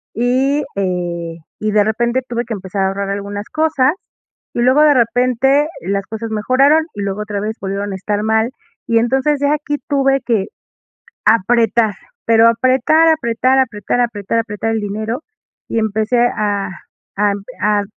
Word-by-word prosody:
y, 260 +5 +1
eh, 175 -3 -3 0.2
y 215 0 -1
de 210 -1 +4
repente 235 +4 0
tuve 240 0 -2
que 230 - -4
empezar 195 0 -3
a - - +2
ahorrar 195 0 -3
algunas 205 +1 -4
cosas, 310 -3 +2 0.6
y - - -3
luego 260 +5 +4
de 300 -1 +6
repente 255 +4 +2
las 195 +2 -2
cosas 225 +1 -5
mejoraron, 270 +8 +3
y 205 - -6
luego 200 +1 -3
otra 205 -1 -4
vez 220 +2 -4
volvieron 200 +1 -3
a - - -4
estar 205 +2 -2
mal, 220 +2 +1 0.4
y, 230 - +2
entonces, 265 +5 +1
ya 285 +1 +2
aquí 295 -1 -2
tuve 275 -1 +2
que 220 -5 0 0.8
apretar, 225 0 +3 0.3
pero 230 0 +5
apretar, 260 +7 +3
apretar, 260 -3 +2
apretar, 235 -2 0
apretar, 230 -2 -1
apretar 225 0 -2
el 225 -1 0
dinero, 215 +6 -4 0.5
y - - -1
empecé 220 +3 0
a 205 -3 -1 0.5
a 205 -1 +3 0.3
a 210 0 +2
225 Hz, 155 wpm, -17 LUFS, 205-255 Hz, 0.8 s, de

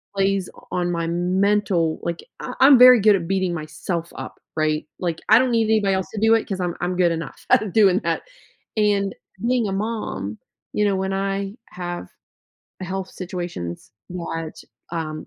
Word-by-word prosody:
plays 195 -1 +1 0.2
on 175 -1 0
my 170 -1 -1
mental, 180 -1 +1
like 170 -1 -3 0.2
I 250 - -5
I'm 270 0 +8
very 250 0 +9
good 210 0 +5
at 170 -3 -3
beating 190 -1 0
myself 170 +2 -4
up, - - -8 0.2
right? 155 -1 0
Like, 170 -2 -2
I 220 +2 +8
don't 255 0 +2
need 230 -1 +3
anybody 215 -3 +2
else 190 -1 -1
to 215 - -3
do 225 +1 +5
it 225 - +2
'cause 195 -2 -3
I'm 175 -2 -2
I'm 180 +1 -1
good 175 -1 +3
enough 165 -3 -6
at 210 -5 +3
doing 195 -4 +5
that, - - -1 0.5
and 205 -2 +1 0.3
being 245 -3 +2
a - - -2
mom, 195 - -3 0.4
you 210 - +2
know, 200 -1 +2
when 190 0 -1
I 195 +1 -2
have 175 -1 -6 0.7
health 190 0 -4
situations 175 - -6 0.2
that, 165 -2 -5 0.4
um, 155 -2 -4
190 Hz, 175 wpm, -22 LUFS, 170-205 Hz, 0.7 s, very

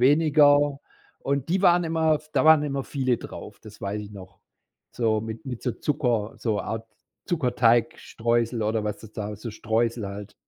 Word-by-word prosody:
weniger. 145 0 +4 0.4
Und 140 +1 -2
die 185 +3 +1
waren 175 -1 +5
immer 160 -1 +2
da - - +2
waren 155 -1 +7
immer 140 -2 -2
viele 130 -4 0
drauf, - - -10
das - - -13
weiß 105 +2 -3
ich 105 - -10
noch. 95 -3 -12 0.5
So 110 -3 +1
mit 110 +7 -7
mit 125 -3 -6
so 125 - 0
Zucker 120 -8 -1
so 110 -3 -1
Art 115 0 -5 0.4
Zuckerteigstreusel 120 - +1
oder 110 +1 0
was 105 - -3
das 110 -1 -13
da 105 -1 -5
so 110 +3 -7
Streusel 115 0 -1
halt. 100 +1 -8
120 Hz, 165 wpm, -25 LUFS, 110-145 Hz, 0.5 s, waren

